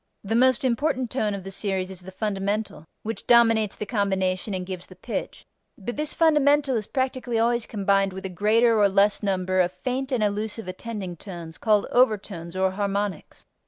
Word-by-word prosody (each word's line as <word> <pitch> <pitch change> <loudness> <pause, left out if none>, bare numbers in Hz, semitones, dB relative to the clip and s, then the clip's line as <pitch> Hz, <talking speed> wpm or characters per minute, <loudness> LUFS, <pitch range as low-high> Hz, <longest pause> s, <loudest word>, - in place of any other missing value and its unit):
The 205 +2 -2
most 255 +2 +4
important 255 0 0
tone 215 -6 0
of 195 - -7
the 195 - -7
series 190 -1 -2
is 185 -1 -9
the 185 - -10
fundamental, 200 -3 -3 0.2
which 225 +1 -5
dominates 225 -3 +4
the 210 - -5
combination 195 -2 -1
and 185 -1 -4
gives 185 -1 -7
the 185 - -14
pitch, 220 +6 -5 0.3
but 235 +4 -5
this 300 0 -2
fundamental 295 -4 +3
is 215 -2 -2
practically 255 -3 -1
always 235 0 +1
combined 195 -2 +1
with 190 +1 -7
a - - -2
greater 220 +5 +3
or 205 -1 +5
less 200 +1 +3
number 185 -2 0
of 180 -1 +3
faint 255 +8 -3
and 245 -4 +1
elusive 210 0 -2
attending 185 -2 -6
tones 170 -3 -9
called 210 -2 +3
overtones 200 -8 +1
or 190 0 +2
harmonics. 200 -2 -3
205 Hz, 180 wpm, -25 LUFS, 190-235 Hz, 0.3 s, or